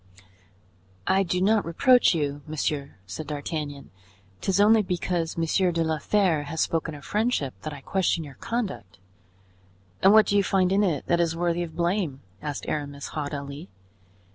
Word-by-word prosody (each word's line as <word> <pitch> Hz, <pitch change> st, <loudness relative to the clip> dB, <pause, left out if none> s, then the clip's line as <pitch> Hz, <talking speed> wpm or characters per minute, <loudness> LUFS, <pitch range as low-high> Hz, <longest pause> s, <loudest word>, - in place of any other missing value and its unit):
"I 190 Hz, +1 st, +3 dB
do 180 Hz, -1 st, 0 dB
not 210 Hz, +2 st, +3 dB
reproach 245 Hz, -, +4 dB
you, 145 Hz, -2 st, -2 dB
monsieur," 150 Hz, -2 st, -2 dB
said 145 Hz, +11 st, -7 dB
D'Artagnan; 145 Hz, -1 st, -5 dB, 0.5 s
"'tis 195 Hz, 0 st, +1 dB
only 215 Hz, +2 st, +6 dB
because 175 Hz, -3 st, -2 dB
Monsieur 175 Hz, +3 st, +2 dB
de 165 Hz, -1 st, 0 dB
la 160 Hz, -1 st, -1 dB
Fere 175 Hz, -4 st, +1 dB
has 160 Hz, +3 st, -5 dB
spoken 160 Hz, -1 st, 0 dB
of 145 Hz, -, -12 dB
friendship 210 Hz, -, 0 dB
that 155 Hz, -, -5 dB
I 145 Hz, -2 st, -9 dB
question 175 Hz, 0 st, 0 dB
your 145 Hz, -3 st, -10 dB
conduct." 190 Hz, -, -4 dB, 1.0 s
"And 195 Hz, -, +7 dB
what 215 Hz, 0 st, +7 dB
do 205 Hz, -, 0 dB
you 200 Hz, -, +4 dB
find 185 Hz, -1 st, +2 dB
in 195 Hz, +1 st, +3 dB
it 170 Hz, -9 st, 0 dB
that 170 Hz, -, +2 dB
is 165 Hz, -1 st, +1 dB
worthy 175 Hz, 0 st, 0 dB
of 165 Hz, -2 st, -5 dB
blame?" 170 Hz, -5 st, -1 dB, 0.2 s
asked 145 Hz, -2 st, -4 dB
Aramis, 145 Hz, -1 st, -4 dB
haughtily. 145 Hz, +1 st, -5 dB
165 Hz, 165 wpm, -26 LUFS, 145-190 Hz, 1.0 s, And